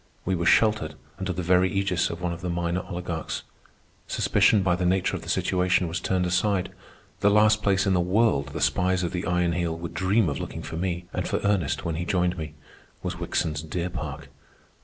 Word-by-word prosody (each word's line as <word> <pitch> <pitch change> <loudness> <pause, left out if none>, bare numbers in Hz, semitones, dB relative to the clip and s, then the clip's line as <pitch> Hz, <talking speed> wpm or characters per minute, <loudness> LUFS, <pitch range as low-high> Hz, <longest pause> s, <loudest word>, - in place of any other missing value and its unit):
We 95 - 0
were 85 -1 0
sheltered 105 -9 +3 0.2
under 95 -1 -2
the 90 0 -3
very 90 +2 +4
ægis 95 -2 0
of 85 +1 -6
one 85 -1 0
of 85 - -8
the 90 - -3
minor 85 +1 -1
oligarchs. 85 -3 -4 0.6
Suspicion, 105 -3 +3
by 90 -2 +2
the 90 - -2
nature 90 +1 +1
of - - -5
the - - -9
situation, 90 -1 +1
was 85 +2 -2
turned 90 +1 0
aside. 90 +1 +1 0.5
The 100 - +4
last 105 +1 +4
place 95 -2 +2
in 95 - +2
the 90 - +3
world 90 -6 +2
the 75 +2 -6
spies 90 0 +2
of 85 - -1
the 90 -1 -3
Iron 90 -1 +1
Heel 85 -1 -1
would 85 0 -6
dream 95 +4 +2
of 70 - -2
looking - - -6
for - - -6
me, 90 0 -2
and - - -2
for - - 0
Ernest 100 -8 0
when 80 -1 -2
he 85 - -2
joined 90 0 +1
me, 80 -3 -6 0.5
was - - -4
Wickson's 75 -3 -1
deer 85 +3 -3
park. 80 -5 -6
90 Hz, 210 wpm, -26 LUFS, 85-95 Hz, 0.6 s, very